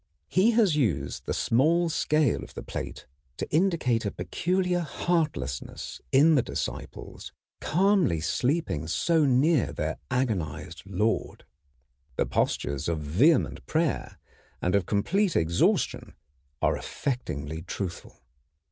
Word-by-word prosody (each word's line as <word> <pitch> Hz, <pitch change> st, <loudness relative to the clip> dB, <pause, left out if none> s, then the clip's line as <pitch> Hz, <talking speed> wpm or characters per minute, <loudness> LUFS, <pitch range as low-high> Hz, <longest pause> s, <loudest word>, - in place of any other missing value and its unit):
He 190 Hz, +5 st, +4 dB
has 200 Hz, -9 st, +4 dB
used 85 Hz, -, -1 dB
the -, -, -1 dB
small 165 Hz, +9 st, +3 dB
scale 155 Hz, -4 st, +1 dB
of -, -, -12 dB
the -, -, -6 dB
plate -, -, -6 dB, 0.3 s
to -, -, -3 dB
indicate 155 Hz, -10 st, +2 dB
a 105 Hz, -, 0 dB
peculiar 180 Hz, -, -1 dB
heartlessness 155 Hz, -, -2 dB
in 150 Hz, +5 st, +6 dB
the 140 Hz, -, +4 dB
disciples -, -, -6 dB, 0.3 s
calmly 185 Hz, -, +2 dB
sleeping 125 Hz, -, -1 dB
so 160 Hz, -, +2 dB
near 140 Hz, +2 st, +3 dB
their -, -, -3 dB
agonized 85 Hz, -, -2 dB
Lord. 105 Hz, +4 st, -1 dB, 0.7 s
The -, -, +1 dB
postures 70 Hz, +2 st, -1 dB
of 85 Hz, -, 0 dB
vehement 90 Hz, -, +2 dB
prayer 160 Hz, -2 st, -1 dB, 0.4 s
and 90 Hz, -, 0 dB
of 100 Hz, -3 st, +2 dB
complete 180 Hz, -, +1 dB
exhaustion 85 Hz, +1 st, +1 dB, 0.5 s
are -, -, +3 dB
affectingly 80 Hz, -, -4 dB
truthful. 95 Hz, -1 st, -6 dB
130 Hz, 115 wpm, -27 LUFS, -, 0.7 s, in